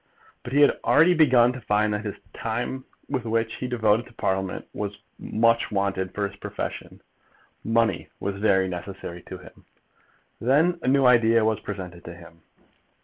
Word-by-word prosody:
But 120 - -8
he 145 - +4
had 145 - +4
already 165 +4 +5
begun 130 -7 +5
to 130 - -8
find 105 0 +1
that 105 0 -3
the 105 -2 -5 0.2
time 120 +4 -4 0.2
which 115 -4 -1
he 125 - -4
devoted 115 -1 +1
to 120 - -18
Parliament 95 -3 -2
was 105 -1 -4 0.2
much 115 +1 +1
wanted 100 -2 -2
for 100 -1 0
his 100 0 -14
profession. - - -6 0.6
Money 115 0 +1
was 100 0 -4
very 95 -3 +3
necessary 90 -1 -7
to - - -9
him. - - -16 0.8
Then 155 +8 +2
a - - -4
new 135 0 +4
idea 115 -2 +5
was 110 -1 +1
presented 90 -4 -7
to 85 - -8
him. 85 -1 -15
110 Hz, 160 wpm, -25 LUFS, 100-125 Hz, 0.8 s, already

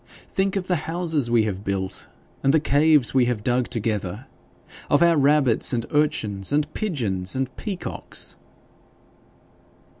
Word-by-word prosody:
Think 195 0 0
of 190 -2 -1
the 180 -1 +1
houses 165 -6 -1
we 115 -2 +3
have 100 -2 -3
built 95 -2 -3 0.3
and 135 - +3
the 160 - +4
caves 150 -4 +3
we 130 -2 +4
have 120 -4 -2
dug 125 +1 +1
together 105 -1 -3 0.6
of 145 +3 +4
our 170 -1 +5
rabbits, 140 -4 +3
and 115 -2 -1
urchins, 125 -10 0
and 150 +1 0
pigeons, 110 - -2
and 130 -1 -3
peacocks!' 195 -4 -5
135 Hz, 140 wpm, -23 LUFS, 110-155 Hz, 0.6 s, our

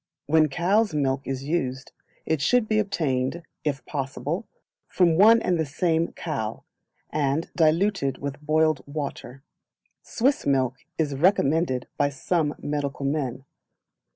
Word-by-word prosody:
When 155 +1 +4
cows' 185 +5 +1
milk 135 -2 0
is 135 0 -3
used 135 -3 -2 0.3
it 160 -3 0
should 240 +8 +3
be 215 0 +2
obtained, 160 -6 -1 0.2
if 140 -3 -2
possible, 145 - -3 0.4
from 175 -3 +3
one 220 +6 +7
and 175 -2 +1
the 160 - +1
same 165 +3 0
cow, - - -4 0.5
and 145 +2 0
diluted 160 -4 +2
with 140 +1 -6
boiled 155 0 +2
water. 140 -3 -6 0.6
Swiss 270 +4 0
milk 130 -2 +1 0.2
is 150 -3 0
recommended 150 -4 +2
by 145 - +2
some 150 +2 -1
medical 145 -1 -3
men. 135 -3 -2
150 Hz, 125 wpm, -25 LUFS, 135-170 Hz, 0.6 s, one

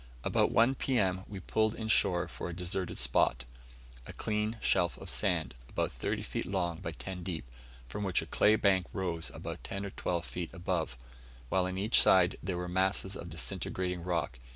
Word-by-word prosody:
About - - +3
1 115 +4 +5
P.M., 95 -9 +1
we 100 -2 -6
pulled 110 +4 +1
in 110 - -4
shore 95 -4 +4
for - - -6
a 85 - -5
deserted 90 +1 -3
spot 65 +1 +2 0.6
a - - -8
clean 110 +1 -1
shelf 85 -5 +2
of - - -5
sand, - - 0 0.2
about - - -1
thirty - - -2
feet - - -3
long 90 -3 -1
by 80 - -4
ten 90 +2 -6
deep, 85 -8 -4 0.4
from 105 +10 -4
which 95 -3 +2
a - - -8
clay 105 - +4
bank 95 -4 +3
rose 85 -4 -2
about - - -7
ten 100 +1 -4
or 100 - -5
twelve 85 -2 -2
feet 85 -3 -5
above, 85 -7 -2 0.5
while 90 +2 +2
on 95 0 -4
each 105 +4 +5
side 90 -2 +5
there 90 0 -2
were 90 0 -3
masses 95 +2 +1
of 85 - -7
disintegrated 90 +1 -2
rock. 85 -7 -2
90 Hz, 185 wpm, -32 LUFS, 85-100 Hz, 0.6 s, 1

